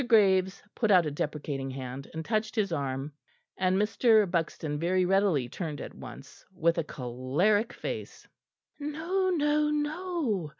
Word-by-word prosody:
Graves 190 -5 +4
put 220 - 0
out 180 -4 +6
a 150 - -2
deprecating 145 -2 -3
hand 130 0 -6
and 160 0 -4
touched 215 0 -1
his 205 -5 +1
arm; 140 -1 -2 0.4
and 185 0 +2
Mr. 215 +1 +4
Buxton 165 -4 -2
very 180 +2 +2
readily 190 -8 +2
turned 150 +2 -5
at - - -7
once 130 +1 -11
with 170 -2 +1
a - - +1
choleric 145 - 0
face! - - -6 0.5
"No, 330 +6 -1
no, 300 -3 +2
no!" 300 - -1
185 Hz, 140 wpm, -29 LUFS, 150-225 Hz, 0.5 s, out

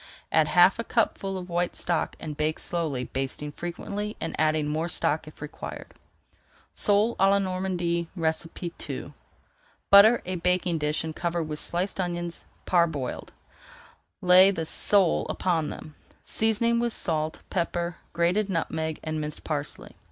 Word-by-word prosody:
Add - - +4
half - - +5
a - - -1
cupful 195 -1 -1
of 180 -1 -7
white 175 0 -1
stock 175 -2 -1
and 150 -2 -6
bake 155 +1 -1
slowly, 155 -7 -2
basting 135 +3 -4
frequently 200 +6 -5
and 165 - -3
adding 155 -1 +2
more 160 +3 -1
stock 155 -1 0
if 155 - -11
required. 150 - -8 0.8
SOLE 210 +3 +3
À 195 +1 +4
LA 200 - +4
NORMANDY 185 -3 -1
II 165 +2 -3 0.8
Butter 215 +4 +8
a 185 +1 -2
baking 180 -1 +1
dish 150 +1 -1
and 160 -1 -5
cover 170 -1 -1
with 155 -1 -4
sliced 180 +3 -1
onions, 175 -1 -3 0.2
parboiled. 160 -8 0 0.9
Lay 185 +1 +8
the 165 -5 -2
sale 190 +2 +2
upon 165 -5 0
them, 155 - -9 0.3
seasoning 225 +1 +2
with 235 -1 0
salt, 155 -1 -1
pepper, 175 -1 -2
grated 180 +5 +1
nutmeg, 160 -3 -2
and 155 -1 -3
minced 150 0 -6
parsley. 145 -2 -4
170 Hz, 140 wpm, -26 LUFS, 155-185 Hz, 0.9 s, Butter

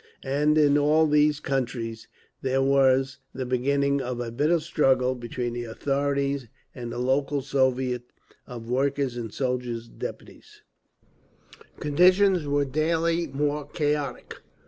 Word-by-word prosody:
And 150 +3 +2
in 145 -1 +4
all 155 +2 +4
these 150 -1 +3
countries 120 -5 -3 0.3
there 135 0 +1
was 135 0 +3 0.2
the 130 - -3
beginning 140 +3 +1
of 125 -1 -4
a 120 -1 -4
bitter 150 +8 +2
struggle 135 -5 +2
between 120 0 -4
the 120 0 -4
authorities 140 +2 -1 0.3
and 120 -2 -6
the - - -5
local 135 +2 0
Soviets 130 -2 0 0.4
of 120 -2 -8
Workers' 135 +1 0
and 115 -3 -5
Soldiers' 125 -3 -3
Deputies…. - - -9 1.2
Conditions 180 +2 +4
were 145 0 +1
daily 165 +4 0
more 145 +1 -2
chaotic. 150 -2 -3
135 Hz, 125 wpm, -26 LUFS, 125-145 Hz, 1.2 s, in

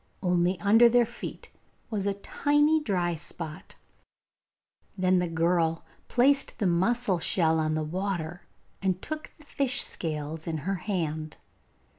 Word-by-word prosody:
Only 180 0 +2
under 225 +6 +6
their 240 0 +4
feet 240 - -8 0.4
was 205 -2 -1
a 200 - 0
tiny 295 +9 +2
dry 180 - 0
spot. 165 0 -6 1.2
Then 185 0 +3
the 180 - 0
girl 165 0 +1 0.2
placed 275 +3 +2
the 210 - -1
mussel 190 +2 +2
shell 160 -1 +2
on 155 0 0
the 155 - -1
water 175 0 -3 0.3
and 190 -2 0
took 310 +8 -6
the 305 - -17
fish 275 -3 0
scales 155 0 -4
in 160 -1 -1
her 195 - 0 0.2
hand. 155 -5 -2
180 Hz, 135 wpm, -28 LUFS, 165-225 Hz, 1.2 s, under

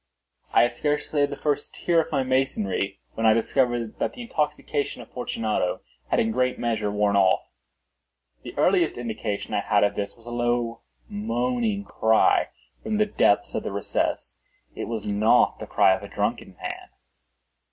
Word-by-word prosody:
I - - +6
had 120 - +2
scarcely 150 +3 -1
laid 145 0 +3
the 140 - -4
first 145 0 -2
tier 170 -2 +2
of - - -8
my 140 -3 +1
masonry 105 -7 0
when 115 0 +1
I 110 - +6
discovered 120 -1 0
that - - -1
the 245 - -8
intoxication 150 - -2
of 120 - -11
Fortunato 110 -6 -2 0.3
had - - +2
in 110 - +2
a - - -1
great 125 +2 +1
measure 110 -3 -1
worn 105 0 +1
off. 95 -2 +3 0.9
The - - -10
earliest - - +3
indication 110 -3 -4
I - - +2
had 105 0 +2
of 100 - +2
this 100 -1 -4
was 115 - -19
a 120 - -7
low 120 -1 -1 0.3
moaning 115 - -1
cry 110 +2 +3 0.3
from 220 -1 -2
the 215 - +4
depth 100 - +2
of - - -1
the - - -4
recess. 100 -9 -2 0.4
It - - -5
was 115 -3 -4
not 105 +4 +3
the 110 - -7
cry 100 -2 +4
of 95 - -3
a 100 - -8
drunken 105 -1 -3
man. - - -6
115 Hz, 175 wpm, -25 LUFS, 105-130 Hz, 0.9 s, I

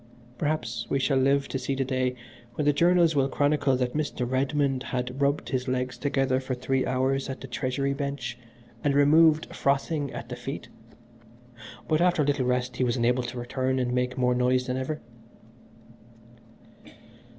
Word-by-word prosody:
Perhaps 125 -7 -2
we 140 - +1
shall 135 0 +2
live 140 +1 +2
to 135 - -2
see 135 +1 -2
the 135 0 -1
day 130 -1 0 0.4
when 150 - -1
the 145 - +4
journals 170 0 +4
will 135 -1 +2
chronicle 145 -2 +2
that 125 -1 -1
Mr. 145 -5 -2
Redmond 135 +1 0
had 125 +1 -4
rubbed 140 +1 +1
his 130 -1 -2
legs 125 0 -1
together 135 -2 0
for 130 -1 -3
three 130 +1 -1
hours 135 +1 0
at 130 - -5
the - - -8
Treasury 130 +3 -1
Bench 140 -4 -4 0.5
and 140 -1 +2
was - - +4
removed 155 +2 +5
frothing 140 +1 0
at 115 - -7
the 125 - -4
feet, 130 +4 -6 1.2
but 155 0 +2
after 175 -3 +3
a - - -1
little 140 -3 +1
rest 125 -1 -1
he - - +1
was 125 +1 +1
enabled 125 +1 +1
to 125 - -6
return 130 +2 -1
and 125 -1 0
make 125 0 -1
more 125 -1 +2
noise 125 +1 +2
than 125 0 -2
ever." 140 +4 -3
130 Hz, 175 wpm, -27 LUFS, 125-140 Hz, 1.2 s, removed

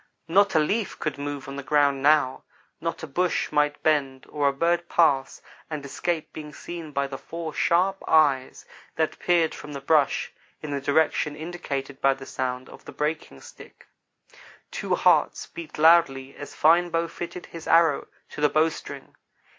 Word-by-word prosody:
Not 200 +2 +3
a - - +6
leaf 200 +7 -1
could 145 -3 -4
move 145 -1 -5
on 135 0 -7
the - - -4
ground 140 0 +2
now 145 -2 +3 0.4
not 165 0 -4
a - - -2
bush 175 +5 -1
might 150 0 +1
bend 140 -4 +1
or 145 -2 0
a - - +4
bird 170 +4 0
pass 140 -6 +2 0.3
and 150 -3 -5
escape 160 +3 -3
being 150 -1 -9
seen 170 -3 -8
by 140 -1 0
the 135 -1 -7
four 165 -2 -6
sharp 190 +3 +1
eyes 145 -5 +2 0.3
that 160 -1 -1
peered 170 -2 +2
from 150 - -9
the 140 - -5
brush 145 0 +1 0.3
in 150 - -5
the 140 -1 -2
direction 150 +1 +1
indicated 145 -5 -5
by 135 0 +3
the 135 0 -11
sound 130 -1 -4
of - - -14
the - - -9
breaking 150 - -4
stick. - - -15 0.8
Two - - -1
hearts - - +2
beat 165 -2 -10
loudly 150 -5 +4
as 145 - -9
Fine 170 +3 +4
Bow 165 0 0
fitted 175 +1 -7
his 165 -1 -10
arrow 165 0 +4 0.2
to - - -7
the 150 - +4
bowstring. 155 +1 -2
150 Hz, 170 wpm, -25 LUFS, 140-165 Hz, 0.8 s, a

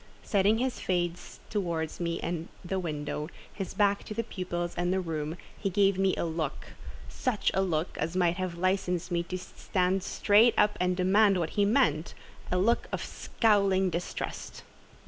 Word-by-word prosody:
Setting 205 +2 +3
his 255 +1 -1
face 175 -1 -2
towards 170 -6 -2
me 170 -1 -1
and 170 -1 -3 0.2
the 190 +2 -1
window, 150 -2 -3 0.2
his 195 -3 -5
back 200 -1 +2
to 215 - -6
the 230 - 0
pupils 175 -5 -4
and 175 +1 0
the 190 - +2
room, 160 -2 -3 0.2
he 195 - -2
gave 195 0 +3
me 195 -1 +3
a - - -1
look—such 165 - -3
a 190 - +2
look 170 -3 -1
as 165 +3 -2
might 175 -1 +2
have 185 -2 -3
licensed 185 -1 0
me 170 -1 +1
to 180 +2 -4
stand 185 +1 -1
straight 215 +5 +4
up 210 0 +4
and 180 0 +1
demand 195 +2 +4
what 165 -3 -1
he 205 - +2
meant—a 180 - 0
look 220 +6 +2
of - - -3
scowling 195 -4 +2
distrust. 170 +2 -5
185 Hz, 165 wpm, -29 LUFS, 170-200 Hz, 0.2 s, straight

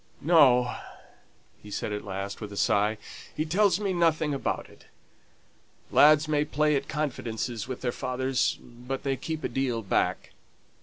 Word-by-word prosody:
"No!" 130 -7 +5 0.8
he 105 - -12
said 105 +1 -3
at 105 - -4
last, 100 +1 -5
with 105 -1 -6
a 100 - -8
sigh. 105 +2 +2 0.4
"He 155 - -1
tells 190 +3 +2
me 200 -2 -1
nothing 160 -3 +1
about 135 - -2
it. - - -19 1.1
Lads 155 +1 +6
may 150 -1 +2
play 150 0 +1
at 140 0 -2
confidences 120 -6 -3
with 130 -1 -6
their 125 - -1
fathers, 130 0 -1
but 125 +2 -7
they 135 -1 0
keep 160 +3 -5
a - - +1
deal 125 -4 -2
back." 95 - -1
135 Hz, 155 wpm, -27 LUFS, 120-155 Hz, 1.1 s, Lads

